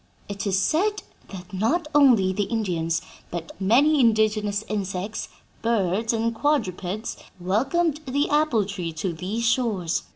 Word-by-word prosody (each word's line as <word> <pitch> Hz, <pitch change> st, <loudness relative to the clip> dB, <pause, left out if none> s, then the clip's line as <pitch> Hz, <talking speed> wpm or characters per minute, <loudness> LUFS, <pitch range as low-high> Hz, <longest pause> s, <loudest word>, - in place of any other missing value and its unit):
It 200 Hz, 0 st, -4 dB
is 190 Hz, -1 st, +2 dB
said 400 Hz, -, +1 dB, 0.3 s
that 180 Hz, -1 st, -10 dB
'not 280 Hz, -, 0 dB
only 245 Hz, -10 st, +5 dB
the 205 Hz, +1 st, 0 dB
Indians, 170 Hz, -8 st, -1 dB, 0.3 s
but 170 Hz, -1 st, -5 dB
many 275 Hz, +10 st, +4 dB
indigenous 215 Hz, -3 st, +2 dB
insects, 200 Hz, 0 st, -3 dB, 0.3 s
birds 220 Hz, -1 st, +1 dB
and 230 Hz, 0 st, 0 dB
quadrupeds, 215 Hz, -, -1 dB, 0.2 s
welcomed 275 Hz, -, +1 dB
the 285 Hz, +3 st, +1 dB
apple 295 Hz, -8 st, +2 dB
tree 180 Hz, -4 st, -5 dB
to 180 Hz, +2 st, -3 dB
these 195 Hz, +8 st, -3 dB
shores. 215 Hz, -9 st, 0 dB
215 Hz, 130 wpm, -24 LUFS, 190-250 Hz, 0.3 s, only